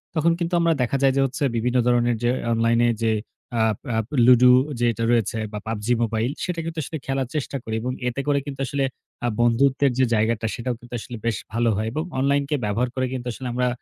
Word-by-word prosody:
তখন 160 +1 +3
কিন্তু 170 0 -2
আমরা 170 -1 +3
দেখা 125 +2 +1
যায় 135 -1 +4
যে 135 - +3
হচ্ছে 135 +2 -3
বিভিন্ন 120 +2 +1
ধরণের 120 -1 +3
যে 120 - +3 0.2
অনলাইনে 115 +1 +3 0.2
যে 110 - +3 0.5
আ - - +3 0.3
আ - - +1 0.3
লুডু 125 0 +7 0.3
যেটা 115 -1 +1
রয়েছে 115 -2 +1
বা 105 - -5
PUBG 110 -1 -3 0.2
MOBILE 115 +3 -1
সেটা 180 -2 -3
কিন্তু 165 -1 -4
আসলে 160 +3 -5
খেলার 135 -1 -1
চেষ্টা 145 -1 -3
করি 110 - -3
এবং 125 +2 -2 0.2
এতে 125 +3 -2
করে 145 -1 +3
কিন্তু 140 -2 -7
আসলে 140 +2 -1 0.4
আ - - +2
বন্ধুত্বের 130 +4 +3
যে 130 - +5
জায়গাটা 110 +1 +1
সেটাও 120 +1 -3
কিন্তু 120 0 -14
আসলে 120 +1 -7
বেশ 115 -3 +1 0.2
ভালো 115 +1 +2
হয়। 110 +1 -1
এবং 155 +6 -2 0.2
অনলাইনকে 140 +2 +1
ব্যবহার 115 +5 0
করে 130 -1 0
কিন্তু 125 -1 -5
আসলে 130 +2 -6
আমরা 125 +1 +1
125 Hz, 210 wpm, -23 LUFS, 115-140 Hz, 0.5 s, লুডু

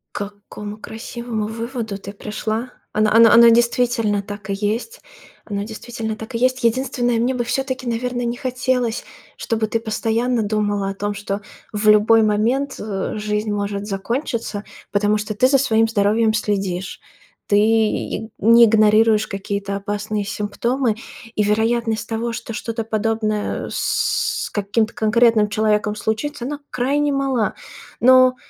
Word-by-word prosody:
К 205 0 -4 0.2
какому 210 0 -7
красивому 220 0 -5
выводу 230 -2 -4
ты 200 0 -8
пришла! 220 +3 -4 0.2
Оно 215 0 +3
оно 230 0 +8
оно 235 0 +8
действительно 235 -3 +2
так 205 0 -9
и - - 0
есть. 220 - -2 0.5
Оно 200 -1 -3
действительно 220 0 -5
так 220 +2 -8
и - - +2
есть. 255 +1 +1
Единственное, 245 0 +1
мне 240 +3 +1
бы 245 -2 -2
все-таки, 260 0 -2
наверно, 245 +1 -2
не 235 +1 -1
хотелось, 250 -2 -1 0.3
чтобы 220 -1 -1
ты 230 - -1
постоянно 225 +1 0
думала 205 -1 0
о - - -3
том, 205 +1 -2
что 200 0 -4 0.3
в 210 0 -2
любой 215 +2 +6
момент, 230 +7 +1
э, 200 -3 -3
жизнь 210 0 -2
может 205 0 -3
закончиться. 225 +1 -3 0.3
Потому 205 +1 +2
что 210 +1 -4
ты 250 +5 +3
за 275 - +4
своим 225 -4 +3
здоровьем 220 +1 +2
следишь. 195 -4 -2 0.5
Ты 205 - +3 0.8
не 230 +2 +7
игнорируешь 215 0 +4
какие-то 200 0 -3
опасные 205 +1 -3
симптомы, 225 +4 -1 0.4
и 210 - +2
вероятность 220 +1 0
того, 230 +1 -2
что 230 - -6
что-то 225 +1 -3
подобное 215 -1 -1
с - - 0
каким-то 215 +2 0
конкретным 220 -1 +3
человеком 210 0 +1
случится, 235 +6 -3
она 290 +3 -4
крайне 285 +4 0
мала. 270 -5 0 0.5
Но 255 0 +6
220 Hz, 140 wpm, -20 LUFS, 210-240 Hz, 0.8 s, оно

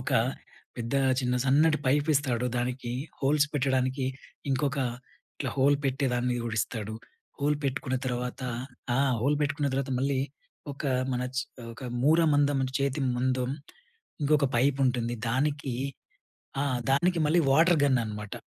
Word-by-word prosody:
ఒక - - -4 0.7
పెద్ద 120 +2 -3 0.3
చిన్న 125 -1 0
సన్నటి 155 +4 +4
పైప్ 145 +3 +2
ఇస్తాడు. 125 -4 +1
దానికి 125 0 -2 0.3
హోల్స్ 145 +2 +3
పెట్టడానికి 130 -1 +1 0.4
ఇంకొక 140 +1 0 0.6
ఇట్ల 135 - -3
హోల్ 140 +2 +5
పెట్టేదాన్ని 125 -2 0
గూడా 115 -1 -3
ఇస్తాడు. 110 -2 -4 0.5
హోల్ 145 +1 +2
పెట్టుకున్న 130 -1 -1
తర్వాత 125 +1 -3 0.5
ఆ! - - +2 0.2
హోల్ 140 +5 +2
పెట్టుకున్న 145 0 0
తర్వాత 135 0 -1
మళ్ళీ 135 0 +1 0.5
ఒక 140 - -8 0.3
మన 125 0 -1
చి 130 - +2 0.3
ఒక 130 - -12 0.2
మూర 155 +5 +5
మందం 145 -1 +3
అంటే 130 0 -3
చేతి 140 +1 0 0.2
మందం. 130 0 0 0.7
ఇంకొక 145 -1 +3
పైప్ 135 +3 +2
ఉంటుంది. 120 -1 0 0.2
దానికి 140 0 0 0.9
ఆ! - - +1 0.3
దానికి 170 +5 +2
మళ్ళీ 170 +3 +4
వాటర్ 165 +4 +5
గన్ 130 -3 +4
అనమాట. 105 -1 -6
135 Hz, 135 wpm, -28 LUFS, 125-145 Hz, 0.9 s, హోల్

